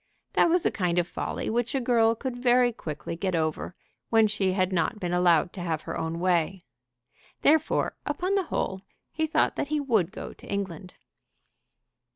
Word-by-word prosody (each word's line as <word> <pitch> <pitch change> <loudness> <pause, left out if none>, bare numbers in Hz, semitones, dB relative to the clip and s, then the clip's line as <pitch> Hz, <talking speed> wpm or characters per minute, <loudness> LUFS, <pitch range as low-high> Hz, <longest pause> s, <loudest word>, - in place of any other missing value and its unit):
That - - +4
was 350 +1 +2
a - - +3
kind 180 -3 -1
of 175 -1 +2
folly - - -4
which 240 +4 0
a - - +2
girl 230 -2 +3
could 255 +1 -4
very 245 0 +3
quickly 155 -4 -6
get 185 +1 -1
over 160 +2 -2 0.3
when 225 -1 +5
she 205 -3 0
had 185 0 +1
not 180 +5 0
been 175 -2 -2
allowed 175 -1 +3
to 185 - -7
have 165 -3 -2
her - - -5
own 160 +1 -3
way. 180 0 +1 0.8
Therefore, 315 +1 +3
upon 370 +1 -1
the 390 -2 +1
whole, 190 -10 -2 0.3
he 315 0 -1
thought 315 - +1
that - - -1
he 300 +1 0
would 220 - +1
go - - -7
to - - -15
England. 190 -2 -4
195 Hz, 185 wpm, -27 LUFS, 175-245 Hz, 0.8 s, when